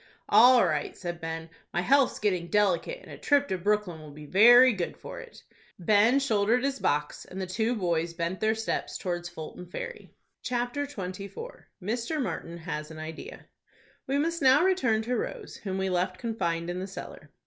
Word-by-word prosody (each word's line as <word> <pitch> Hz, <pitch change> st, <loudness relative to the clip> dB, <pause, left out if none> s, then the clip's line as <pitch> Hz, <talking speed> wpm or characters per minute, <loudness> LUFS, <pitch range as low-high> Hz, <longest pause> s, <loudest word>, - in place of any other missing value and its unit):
"All 245 Hz, -1 st, +7 dB
right," 155 Hz, -4 st, -2 dB
said 175 Hz, -1 st, -5 dB
Ben; 165 Hz, 0 st, -5 dB, 0.2 s
"my 175 Hz, -, 0 dB
health's 275 Hz, +7 st, +3 dB
getting 185 Hz, -5 st, 0 dB
delicate, 210 Hz, -, +1 dB
and -, -, -13 dB
a -, -, -10 dB
trip 285 Hz, -1 st, +3 dB
to 190 Hz, -, 0 dB
Brooklyn 200 Hz, -4 st, 0 dB
will 155 Hz, -, -11 dB
be 150 Hz, +1 st, -11 dB
good 230 Hz, -, +6 dB
for -, -, -8 dB
it." -, -, -13 dB, 0.3 s
Ben 215 Hz, +8 st, +4 dB
shouldered 230 Hz, -1 st, +2 dB
his 275 Hz, 0 st, -1 dB
box, 150 Hz, +1 st, -1 dB
and 190 Hz, -, -9 dB
the 190 Hz, -, -2 dB
two 220 Hz, +6 st, -1 dB
boys 170 Hz, -4 st, -1 dB
bent 170 Hz, +2 st, -2 dB
their 220 Hz, +1 st, +2 dB
steps 220 Hz, 0 st, -3 dB
towards 175 Hz, -2 st, -3 dB
Fulton 175 Hz, +1 st, -9 dB
Ferry. 180 Hz, -, -7 dB, 0.3 s
CHAPTER 245 Hz, +4 st, -2 dB
XXIV. 200 Hz, -, -7 dB, 0.2 s
MR. 235 Hz, -, -2 dB
MARTIN 170 Hz, -7 st, -5 dB
HAS 155 Hz, -2 st, -5 dB
AN 160 Hz, -, -10 dB
IDEA. 155 Hz, +1 st, -8 dB, 0.6 s
We 275 Hz, -, +1 dB
must 330 Hz, +3 st, -1 dB
now 270 Hz, +3 st, +6 dB
return 255 Hz, -13 st, +2 dB
to 245 Hz, +3 st, -1 dB
Rose, -, -, -5 dB
whom 190 Hz, -2 st, -4 dB
we 190 Hz, 0 st, -1 dB
left 185 Hz, +1 st, 0 dB
confined 175 Hz, -7 st, -2 dB
in 180 Hz, -, -4 dB
the 190 Hz, -, -4 dB
cellar. 195 Hz, -, -9 dB
200 Hz, 180 wpm, -28 LUFS, 175-245 Hz, 0.6 s, All